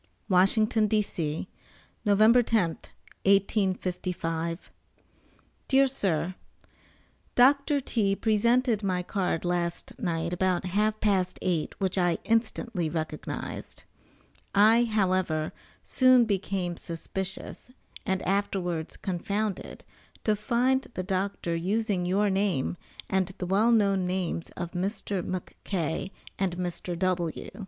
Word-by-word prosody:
WASHINGTON, 215 +4 +4
D.C., 180 -7 -1 0.6
November 215 +3 +5
10th, 215 -8 0 0.4
1855. 185 -4 0 1.0
DEAR 275 0 +5
SIR: 185 - -1 1.0
Doctor 280 +3 +4
T. 210 -6 0
presented 230 +2 +2
my 185 -3 -1
card 180 -3 -1
last 175 -1 -2
night 170 -1 -1
about 180 0 0
half 210 +4 +1
past 190 -4 +1
eight 175 -4 -1
which 190 0 0
I 175 -2 +2
instantly 225 -5 0
recognized. 155 -1 -5 0.7
I, 220 +4 +6
however, 185 -7 0 0.3
soon 255 -2 +5
became 195 -4 -2
suspicious, 190 +6 -3 0.3
and 190 -2 -1
afterwards 185 -4 -1
confounded, 200 +2 -3 0.4
to 215 - +2
find 250 +4 +1
the 185 - -2
doctor 185 -2 -2
using 190 +1 0
your 200 +2 +2
name 190 -8 0 0.3
and 190 -1 +1
the 180 - -3
well 205 +6 +3
known 200 -4 +3
names 180 -2 -2
of 175 -1 -4
Mr. 195 +1 -2
McK. 180 -2 -3 0.3
and 185 -3 0
Mr. 175 -1 -4
W. 175 -2 -1
190 Hz, 105 wpm, -28 LUFS, 175-215 Hz, 1.0 s, I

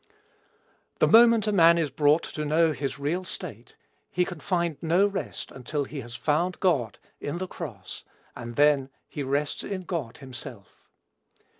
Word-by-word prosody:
The - - +4
moment 230 -1 +7
a 210 - +1
man 170 -3 +6
is 160 -4 0
brought 150 +2 +3
to 150 - -5
know 160 +2 +3
his 140 -2 -3
real 155 +6 -1
state, 185 - -9 0.3
he 180 - +1
can 175 -4 -7
find 170 -3 -1
no 175 +4 +3
rest 200 -1 -4
until 140 +3 -3
he 140 0 -6
has 120 -1 -9
found 165 +7 0
God, 140 - +1 0.2
in 145 +4 -4
the 185 - -3
cross, - - -8 0.3
and 120 -1 -7
then 145 -2 +4 0.2
he 145 - -6
rests 140 +2 -1
in 190 -2 -4
God 155 -10 -4
himself. 120 -6 -10
155 Hz, 160 wpm, -27 LUFS, 140-180 Hz, 0.3 s, moment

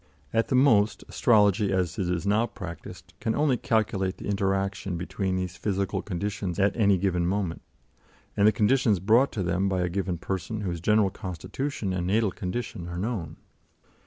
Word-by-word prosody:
At 115 0 +2
the - - 0
most, 115 -6 +4
astrology, 105 -3 +3
as 90 -2 -1
it 90 -2 0
is 90 0 -1
now 105 +4 +2
practised, 90 -7 -9
can 110 - -1
only 145 -3 +2
calculate 100 -5 0
the - - -9
interaction 95 -2 -1
between 95 +2 -2
these 90 -1 -3
physical 100 -2 -1
conditions 100 -1 -3
at 100 0 +2
any 100 -4 +4
given 90 -2 0
moment, 95 -3 -2 0.7
and 100 - +4
the - - +7
conditions 110 0 +2
brought 115 +9 +4
to 100 - -2
them 90 +3 0
by 95 -1 0
a 90 - 0
given 90 -1 -2
person 95 +5 -4
whose 85 -4 -3
general 105 0 +3
constitution 95 - -4
and 90 -1 -2
natal 105 +1 +2
condition 105 -1 -5
are 85 0 -5
known. 100 -2 -3
100 Hz, 170 wpm, -27 LUFS, 90-110 Hz, 0.7 s, the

